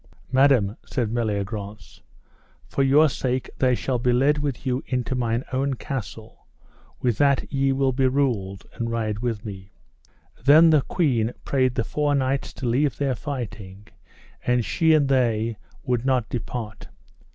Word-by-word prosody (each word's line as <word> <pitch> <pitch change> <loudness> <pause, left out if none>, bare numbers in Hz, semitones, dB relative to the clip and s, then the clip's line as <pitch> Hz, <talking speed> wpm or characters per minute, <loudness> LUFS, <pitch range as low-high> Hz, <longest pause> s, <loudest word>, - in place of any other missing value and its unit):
Madam, 130 -6 +3
said 120 -5 -2
Meliagrance, 105 -2 -4 0.6
for - - -2
your 140 +4 +5
sake 130 -2 -2
they 130 -1 +3
shall 125 0 -2
be 125 +1 +1
led 140 +5 +3
with 145 -3 -3
you 130 0 0
into 125 -1 -2
mine 120 -1 -1
own 135 +1 0
castle, 115 -5 -7 0.5
with 120 -4 0
that 140 0 +2
ye 135 0 +2
will 135 0 +1
be 130 +1 +2
ruled, 120 -8 -1
and 115 0 -3
ride 110 -2 -2
with 115 -3 -3
me. 95 -2 -8 0.7
Then 155 +5 +7
the 155 -2 +5
queen 125 -9 0
prayed 130 -3 +1
the 115 - 0
four 145 +3 0
knights 135 0 -1
to 135 - -7
leave 130 +3 +1
their 140 -2 0
fighting, 105 -8 -7 0.5
and 125 -2 +1
she 160 -1 +3
and 145 -3 +3
they 115 -4 +1 0.3
would 125 -2 -1
not 130 -4 +1
depart. 115 -2 -5
125 Hz, 150 wpm, -24 LUFS, 115-135 Hz, 0.7 s, Then